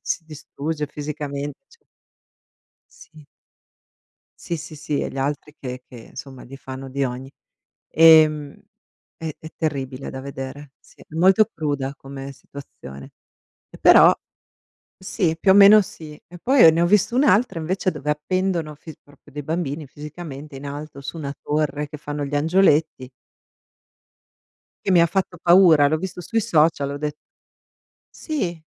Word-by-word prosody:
si 165 - -3
distrugge 155 0 -5
fisicamen 145 -1 -5 0.2
c 465 -2 -24 1.2
Sì. 155 -2 -18 1.2
Sì, 170 - -3
sì, 155 0 -9
sì, 150 -1 -3
e - - -3
gli 135 - -8
altri 145 +2 -3
che 125 -1 -7
che, - - -17 0.2
insomma, 135 -1 -10
gli 135 +2 -11
fanno 135 0 -9
di 140 +1 -1
ogni. 130 +1 -5 0.6
Ehm, 155 -2 +5 0.6
è 160 -2 -6
è 160 - -11
terribile 135 -4 -4
da 130 - -7
vedere, 135 +1 -8
sì, - - -21
molto 190 +7 +4
cruda 145 -4 -3
come 135 0 -9
situazione. 125 - -12 0.6
E - - -14
però - - +7 0.9
sì, 185 -3 -1
più 190 - +3
o - - +7
meno 205 +1 +8
sì. 155 -5 -11
E 175 - -13
poi 265 0 +5
ho 160 - +10
ne 165 - 0
ho 170 - +3
vista 210 +5 +2
un'altra 245 - +2
invece 185 +4 -1
dove 150 -3 -7
appendono 165 +1 -2
fis 155 +1 -12
proprio 145 -1 -21
dei 145 +1 -6
bambini 155 -1 -3
fisicamente 150 0 -9
in 135 - -10
alto 145 0 -8
su 140 +4 -7
una 140 -2 -5
torre 150 -1 -1
che 150 0 -9
fanno 145 0 -5
gli 140 +1 -5
angioletti. 155 -4 +2 1.7
Che - - -1
mi 180 -2 +6
ha 170 - +5
fatto 185 0 -2
paura, 170 -5 +6
l'ho 155 +2 +1
visto 180 +2 -6
sui 225 +5 -1
social, 155 -6 +2
ho 140 - -5
de 150 0 -3 1.0
Sì. 180 - -4
150 Hz, 150 wpm, -22 LUFS, 140-170 Hz, 1.7 s, ho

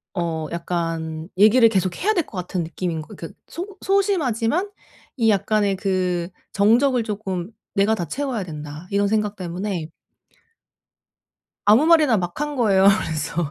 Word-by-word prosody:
어 165 -3 -2
약간 165 -2 -3
얘기를 225 +3 +6
계속해야 195 - 0
될 345 - +1
것 195 - -10
같은 180 -1 -3
느낌인 165 -1 -3
거 - - -11
그 - - -9
소극 380 +3 -7
소심하지만 360 - +1 0.5
이 225 -2 +3
약간의 205 0 +2
그 180 -3 -1 0.3
정적을 235 +5 +3
쪼끔 200 -3 -4 0.2
'내가 205 +3 +3
다 175 - -3
채워야 260 - -3
된다.' 150 0 -8
이런 200 0 +2
생각 210 -1 0
때문에 180 -2 -4 1.8
아무 220 +9 +6
말이나 305 -9 +5
막 175 +3 -4
한 295 -1 -2
거예요. 200 -5 +4 0.2
그래서 155 -1 -4
200 Hz, 285 characters per minute, -22 LUFS, 175-235 Hz, 1.8 s, 얘기를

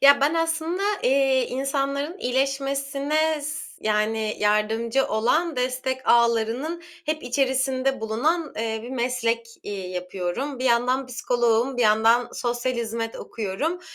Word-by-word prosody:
Ya, 280 0 +7
ben 295 +4 +3
aslında, 330 +3 0 0.2
eee, 265 -1 +3
insanların 275 +5 -2
iyileşmesine 275 +3 0
s 300 +1 -4 0.2
yani, 215 0 0
yardımcı 220 +5 +1
olan 300 +8 +1
destek 255 +1 -2
ağlarının 235 +8 +2 0.2
hep 310 0 -1
içerisinde 265 +1 0
bulunan, 295 +10 0
eee, 220 0 -2
bir 240 - -8
meslek, 235 -2 -1 0.2
iii, 190 -3 -5
yapıyorum. 185 +9 -3
Bir 255 - -3
yandan 250 +2 +2
psikoloğum, 245 0 +1
bir 245 - +2
yandan 225 +2 +4
sosyal 240 +1 -1
hizmet 230 -1 -3
okuyorum. 235 - -3
255 Hz, 120 wpm, -24 LUFS, 230-275 Hz, 0.2 s, Ya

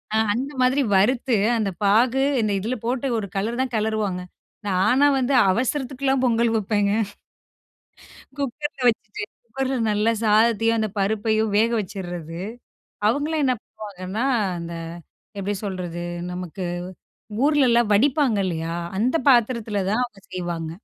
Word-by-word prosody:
ஆ - - +4 0.2
அந்த 265 +5 -3
மாதிரி 260 +3 +3
வறுத்து, 235 +4 +3 0.2
அந்தப் 195 -5 -2
பாகு, 235 +6 +4 0.2
இந்த 215 -1 0
இதுல 230 +6 -2
போட்டு 255 +2 -1
ஒரு 200 -2 -3
கெளரு 220 +5 -1
தான் 260 -2 -2
கெளறுவாங்க. 210 -4 -1 0.5
நானா 245 +10 +3
வந்து 265 +1 +1 0.2
அவசரத்துக்குலாம் 265 +3 0
பொங்கல் 235 -1 +2
வப்பேங்க. 205 -1 +1 1.5
குக்கர்ல 285 +1 -4
வச்சுட்டு, 220 -2 -4 0.2
குக்கர்ல 265 +3 -2
நல்லா 210 +2 +2
சாதத்தையும் 225 +1 +3
அந்தப் 215 -1 -2
பருப்பையும் 215 +1 +1
வேக 230 +2 +3
வச்சுர்றது. 175 -4 -6 0.7
அவுங்களாம் 295 +4 0
என்ன 255 -1 +2
பண்ணுவாங்கன்னா, 205 +2 -5 0.3
அந்த 170 0 -6 0.7
எப்டி 200 +1 -2
சொல்றது? 175 -3 -4 0.3
நமக்கு 180 +1 -6 0.8
ஊர்லலாம் 240 -7 +3
வடிப்பாங்க 260 0 +3
இல்லயா? 165 -1 -3 0.2
அந்த 250 +7 +1
பாத்திரத்தில 230 -5 +2
தான் 230 +4 +1
அவுங்க 210 -5 -8
செய்வாங்க. 170 -3 -3
220 Hz, 120 wpm, -23 LUFS, 195-255 Hz, 1.5 s, ஆ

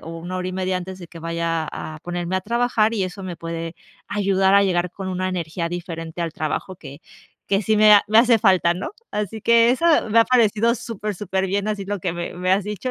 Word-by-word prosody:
o 165 - -9
1 175 +2 -5
hora 185 0 -3
y - - -5
media 185 0 -1
antes 185 +1 -8
de 175 - -10
que 170 - -12
vaya 165 -1 -2
a 155 0 -7
ponerme 175 +1 -3
a - - -1
trabajar 230 +1 +1
y 205 - 0
eso 185 +1 -7
me 180 -2 -6
puede 165 0 -5 0.3
ayudar 195 -1 +2
a 200 - +6
llegar 180 -2 0
con 190 +1 -6
una 185 0 -2
energía 170 -1 -3
diferente 170 -1 -5
al 165 - -3
trabajo 155 +5 -4
que 140 -4 -11 0.5
que 195 0 +1
sí 215 +1 +1
me 215 0 +7
ha 205 - +7
me 215 - +3
hace 235 -1 +5
falta, 185 -5 +3
¿no? 180 - -5 0.2
Así 210 +1 -4
que 235 0 +5
eso 260 +7 0 0.2
me 220 +2 +3
ha 230 - +5
parecido 230 -1 +3
súper, 215 -3 -5
superbién, 195 +1 -2
así 210 -2 -3
lo 205 +1 -3
que 175 -1 -2
me 175 0 -5
me 180 +1 -2
has 195 0 +2
dicho. 210 +4 -4
190 Hz, 235 wpm, -22 LUFS, 175-210 Hz, 0.5 s, me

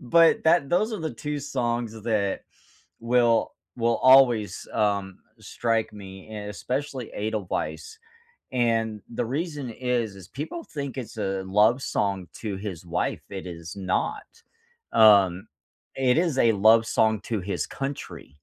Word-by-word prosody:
But 165 +6 +4
that 160 -2 +4
those 210 +8 +1
are 215 - -3
the 160 -5 -4
2 150 +4 -4
songs 120 -5 -2
th 110 -1 -11
that 105 -4 0 0.6
will 120 -1 +2 0.3
will 115 -1 +2
always, 120 -7 +5
um, 100 -3 0 0.2
strike 115 -2 -1
me 95 -1 -11
and 105 -1 -6
especially 130 +3 -4
Edelweiss, 110 - -3 0.6
and 115 -4 0
the 115 - -2
reason 145 0 -3
is 120 -3 -2
is 95 -2 -12
people 160 - -6
think 140 -2 -6
it's 120 -3 -7
a 95 -2 -2
love 105 +7 +3
song 100 -6 -1
to 105 -4 -3
his 95 -4 -7
wife. 85 +1 -2
It 95 -1 -6
is 85 -1 -8
not. 95 -1 -2 0.6
Um, 100 -2 +5 0.5
it 130 -2 +2
is 165 -6 +1
a 115 -3 +5
love 110 +2 +5
song 110 0 +2
to 110 -4 -1
his 95 +2 -3
country. 135 +1 -6
115 Hz, 145 wpm, -25 LUFS, 100-130 Hz, 0.6 s, always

